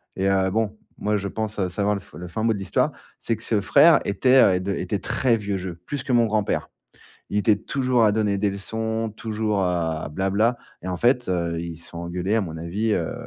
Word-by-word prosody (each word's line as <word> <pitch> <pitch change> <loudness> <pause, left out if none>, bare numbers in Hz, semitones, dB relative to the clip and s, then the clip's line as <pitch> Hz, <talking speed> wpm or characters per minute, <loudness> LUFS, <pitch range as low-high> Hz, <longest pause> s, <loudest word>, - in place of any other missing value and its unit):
et 95 - 0
heu, 95 -1 +2
bon, 110 +1 -1 0.2
moi, 105 0 0
je 100 0 -3
pense, 110 +1 -4
heu, 95 -2 0
savoir 100 +3 0
le 100 - -5
f 100 - -18
le 90 - -7
fin 110 +6 -4
mot 115 - +3
de - - -4
l'histoire. 95 - 0 0.3
C'est 115 - -1
que 110 - -9
ce 110 -3 +1
frère 95 - +6
était, 115 -2 +4
heu, - - -2
de 100 +2 -2
était 100 - -2
très 120 +2 +1
vieux 100 -2 -2
jeu, 90 -2 -5
plus 145 -3 -4
que - - -3
mon 120 -1 +5
grand-père. 110 -2 -1 0.6
Il - - -1
était 105 +1 +4
toujours 125 +2 +1
à 105 - +4
donner 105 -2 +1
des 100 +1 +1
leçons, 110 +3 -3
toujours 110 -2 -1
à 85 -4 -1
bla-bla, 95 +8 +1 0.3
et 90 - -7
en 90 -1 -2
fait, 125 +2 +2
heu, 85 -2 -1
ils 85 -1 -6
se 85 - -12
sont 85 - -8
engueulés 90 +4 -2
à 115 - +2
mon 80 -4 -5
avis, 100 +7 -1
heu, - - -1
100 Hz, 235 wpm, -24 LUFS, 90-110 Hz, 0.6 s, frère